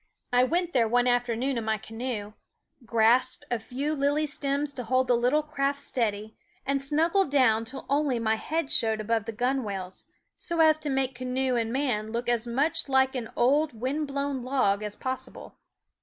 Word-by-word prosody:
I 245 0 +5
went 350 +5 -1
there 235 -3 +3
one 245 +2 +2
afternoon 245 +1 0
in 225 - -5
my 220 0 0
canoe, 225 -1 -5 0.5
grasped 235 +3 +2
a 240 - 0
few 270 +7 -3
lily 290 +1 +1
stems 285 0 -2
to 255 - -5
hold 255 +2 +1
the 245 - +4
little 250 +6 +2
craft 280 -2 -1
steady, 220 -6 -2 0.3
and 275 0 0
snuggled 325 +6 +2
down 230 -5 +3
till 265 +4 -7
only 280 -2 +1
my 220 -1 +1
head 305 +7 -2
showed 220 -7 +4
above 220 0 -1
the 230 - -4
gunwales, 220 -6 -3 0.3
so 340 -1 -3
as 315 -1 +5
to 300 - -3
make 265 -1 0
canoe 255 +1 -1
and 230 -1 -1
man 240 -5 -1
look 235 +1 -2
as 240 -1 0
much 275 +5 0
like 265 0 +3
an 240 -4 -4
old, 270 0 +2
wind 285 +5 -1
blown 280 -1 -2
log 240 -6 +1
as 210 -1 -4
possible. 260 +3 -6
255 Hz, 180 wpm, -27 LUFS, 230-280 Hz, 0.5 s, I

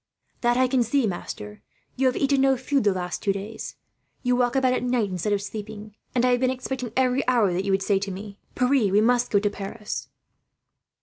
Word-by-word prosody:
"That 240 0 +2
I 255 0 +4
can 255 0 +2
see, 240 +3 +2
master. 105 - -5 0.3
You 265 0 +2
have 250 - +1
eaten 275 -1 +2
no 270 -1 +4
food 270 0 0
the 205 - +5
last 180 -1 -3
two 200 - +1
days. 200 +3 -6 0.5
You 250 -1 +2
walk 245 0 +1
about 260 -1 +3
at - - 0
night, 245 -5 0
instead 185 +3 -2
of 200 -1 0
sleeping; 210 0 -7 0.2
and 245 0 +3
I 250 - +4
have 245 - +3
been 255 0 +2
expecting, 255 -2 -4
every 255 0 +3
hour, 230 -7 +3
that 185 +3 -1
you 200 - 0
would 195 0 +1
say 195 -1 +2
to 200 0 -4
me, 200 +2 -8 0.2
'Pierre, 250 -5 +2
we 200 - +4
must 245 +2 +3
go 205 - +3
to 205 +1 +2
Paris.'" 205 +2 -6
230 Hz, 225 wpm, -25 LUFS, 200-255 Hz, 0.5 s, the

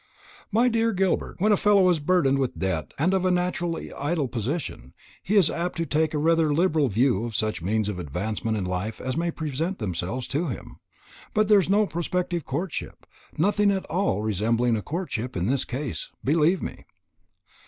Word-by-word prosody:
"My 230 +4 +4
dear 230 -1 +2
Gilbert, 190 -1 0
when 210 +4 +2
a - - +6
fellow 200 -2 +4
is 170 - +1
burdened 145 -4 +2
with 130 -2 -1
debt 95 -5 -2
and 170 +7 +2
of 190 -1 +1
a 185 - +3
naturally 180 -1 -1
idle 150 0 -1
disposition, 120 - -4 0.3
he 205 - -1
is 190 -6 +5
apt 175 +1 -3
to 165 - 0
take 155 0 +1
rather 160 +1 +3
a - - +2
liberal 160 -4 +3
view 115 -1 +2
of 115 -2 -5
such 110 -4 -1
means 105 +4 0
of 100 -3 -3
advancement 105 - -2
in 95 - -2
life 90 +5 -3
as 130 0 -3
may 170 +2 0
present 160 +3 -3
themselves 95 +4 -3
to 160 +5 -1
him. 125 - -7 0.6
But 215 0 +3
there 210 -1 +7
is 185 - -1
no 210 +2 +4
prospective 175 -2 -2
courtship 150 +6 -4 0.3
nothing 205 +4 +3
at 195 -1 0
all 175 - 0
resembling 115 +3 +1
a 110 - -2
courtship 130 - -4
in 90 - 0
this 130 +5 0
case, 130 0 -4
believe 160 +5 +2
me. - - -6
150 Hz, 185 wpm, -25 LUFS, 115-180 Hz, 0.6 s, there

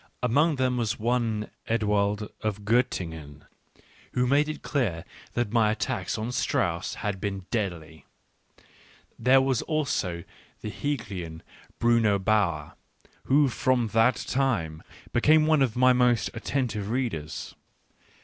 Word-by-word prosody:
Among 145 +6 +3
them 130 -1 0
was 115 -1 -1
one, 115 -2 -1 0.2
Ewald 105 -2 0
of 105 -1 -3
Gottingen, 80 - -1 0.7
who 125 - +2
made 145 +4 +3
it 155 - -6
clear 105 - -1 0.3
that 120 -4 0
my 115 -3 +4
attack 120 +4 -2
on 110 +3 -3
Strauss 85 -8 -1
had 100 -2 -2
been 100 -2 -3
deadly. 85 -8 -3 1.1
There 130 +1 +5
was 130 -3 +1
also 115 - -1 0.4
the 105 - -5
Hegelian, 95 - -4 0.3
Bruno 115 -3 +3
Bauer, 95 -7 0 0.5
who 140 +2 +4
from 125 -1 +1
that 115 +4 +4
time 100 -13 -1 0.3
became 155 +5 +5
one 155 -2 +3
of 125 -5 +1
my 130 +1 +5
most 125 -2 +2
atten 135 -3 -1
tive 105 -2 -4
readers. 110 - -3
115 Hz, 125 wpm, -27 LUFS, 100-130 Hz, 1.1 s, There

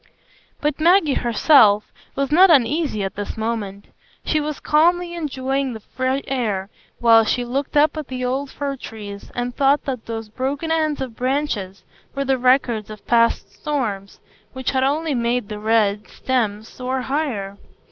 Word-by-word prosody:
But 295 0 -1
Maggie 335 -2 +4
herself 230 -3 +4 0.2
was 275 0 -1
not 370 +5 +7
uneasy 285 -5 +2
at 195 - -3
this 205 +2 -5
moment. 215 -3 -4 0.4
She 310 - +1
was 300 -1 -4
calmly 345 +3 +2
enjoying 270 -4 -2
the 220 - -7
free 260 +5 -2
air, 210 -7 -2 0.3
while 230 -1 +6
she 245 +2 0
looked 275 +4 -2
up 300 +1 +4
at 305 -3 -5
the 255 -1 -4
old 265 +3 -2
fir 280 0 -4
trees, 205 -4 -9
and 245 0 -2
thought 280 +1 +3
that 255 -5 -4
those 225 -1 -5
broken 275 +8 -3
ends 310 -3 0
of 255 -4 -5
branches 250 -8 -2 0.3
were 275 0 -1
the 265 -1 +1
records 245 -4 +2
of 215 -1 -10
past 230 -1 +2
storms, 215 -10 -3 0.3
which 260 0 -2
had 260 -1 +1
only 300 +3 0
made 235 -2 -1
the 210 -1 -5
red 210 -1 +1
stems 220 -4 -2
soar 255 +1 -4
higher. 250 -9 -3
255 Hz, 160 wpm, -21 LUFS, 220-285 Hz, 0.4 s, not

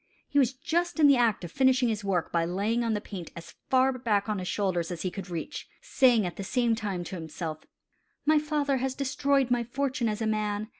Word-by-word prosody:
He 285 - +2
was 265 -1 +3
just 340 +5 -1
in 305 - +6
the 280 -1 +7
act 230 -6 +2
of 170 - -6
finishing 260 +1 +3
his 215 -2 -2
work 190 -4 -1
by 170 -1 +1
laying 205 +7 0
on 225 -2 0
the - - -1
paint 185 -6 -7
as 170 - -10 0.2
far 260 0 +4
back 210 -4 +1
on 210 -2 -1
his 180 - -5
shoulders 185 -5 -1
as 175 -2 -5
he 185 - -1
could 190 -1 -7
reach, 175 - -5
saying 245 -6 +3
at 175 - -5
the 195 - -4
same 240 +3 +1
time 205 -5 -3
to 180 - -6
himself: 160 -1 -5 0.7
"My 310 0 +5
father 295 -2 0
has 260 0 -2
destroyed 275 -1 +1
my 240 -1 +2
fortune 260 -1 -1
as 210 0 -3
a 225 - -1
man. 215 0 -1
225 Hz, 230 wpm, -28 LUFS, 190-265 Hz, 0.7 s, the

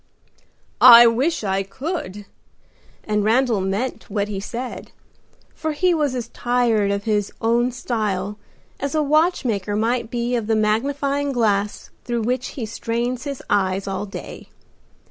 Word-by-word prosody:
"I 240 -1 +11
wish 255 +6 +1
I 195 -1 0
could!" 205 - -5 0.8
and 210 -1 0
Randal 230 -1 +2
meant 200 +7 -3
what 205 0 -1
he 200 -2 -3
said, 240 +5 -6 0.6
for 315 -1 -3
he 360 +4 +2
was 295 -5 0
as 235 -2 -4
tired 240 -5 +1
of 200 0 -1
his 210 -2 0
own 235 +2 +2
style 210 -5 -3 0.4
as 280 +2 -3
a 305 - +2
watch 310 +2 +2
maker 205 -3 -1
might 230 +2 0
be 240 +1 -1
of 230 -3 -2
the 225 - +2
magnifying 275 +6 0
glass 210 -5 0
through 235 -2 -2
which 250 +3 -1
he 240 - -2
strains 235 +3 -3
his 280 -2 -5
eyes 195 -1 0
all 195 +1 -3
day. 195 - -9
230 Hz, 145 wpm, -21 LUFS, 205-255 Hz, 0.8 s, I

